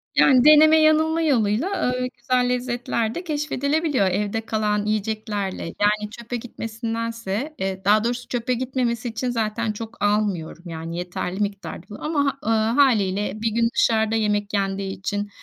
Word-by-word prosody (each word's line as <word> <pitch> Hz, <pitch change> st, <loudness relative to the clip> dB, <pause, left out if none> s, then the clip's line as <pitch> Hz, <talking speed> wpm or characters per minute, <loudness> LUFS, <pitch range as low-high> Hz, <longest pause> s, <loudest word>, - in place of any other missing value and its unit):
Yani 260 Hz, -1 st, +5 dB
deneme-yanılma 310 Hz, +1 st, +6 dB
yoluyla, 245 Hz, -, +1 dB
aaa, 250 Hz, -7 st, 0 dB
güzel 250 Hz, 0 st, +1 dB
lezzetler 245 Hz, -2 st, -1 dB
de 355 Hz, -, -4 dB
keşfedilebiliyor 295 Hz, -, 0 dB
evde 205 Hz, +4 st, -1 dB
kalan 210 Hz, -1 st, 0 dB
yiyeceklerle. 215 Hz, -2 st, -2 dB
Yani, 210 Hz, +4 st, 0 dB
çöpe 235 Hz, +1 st, -6 dB
gitmesindense, 230 Hz, +2 st, -4 dB
e 190 Hz, 0 st, -3 dB
daha 210 Hz, +1 st, +4 dB
doğrusu 245 Hz, +1 st, -2 dB
çöpe 245 Hz, +1 st, -1 dB
gitmemesi 245 Hz, -2 st, -1 dB
için 230 Hz, +3 st, -3 dB
zaten 225 Hz, -1 st, -1 dB
çok 225 Hz, +1 st, -8 dB
almıyorum, 205 Hz, -6 st, 0 dB
yani, 165 Hz, 0 st, -6 dB
yeterli 180 Hz, +1 st, -4 dB
miktarda 195 Hz, -4 st, -4 dB
ı -, -, -8 dB
ama 285 Hz, -3 st, 0 dB
ııı, 225 Hz, -, +2 dB, 0.2 s
hâliyle 210 Hz, -8 st, +3 dB
1 225 Hz, -, +1 dB
gün 230 Hz, +1 st, +2 dB
dışarıda 220 Hz, -1 st, +2 dB
yemek 210 Hz, -2 st, 0 dB
yendiği 195 Hz, -1 st, -2 dB
için, 205 Hz, +1 st, -3 dB
225 Hz, 140 wpm, -23 LUFS, 205-250 Hz, 0.2 s, deneme-yanılma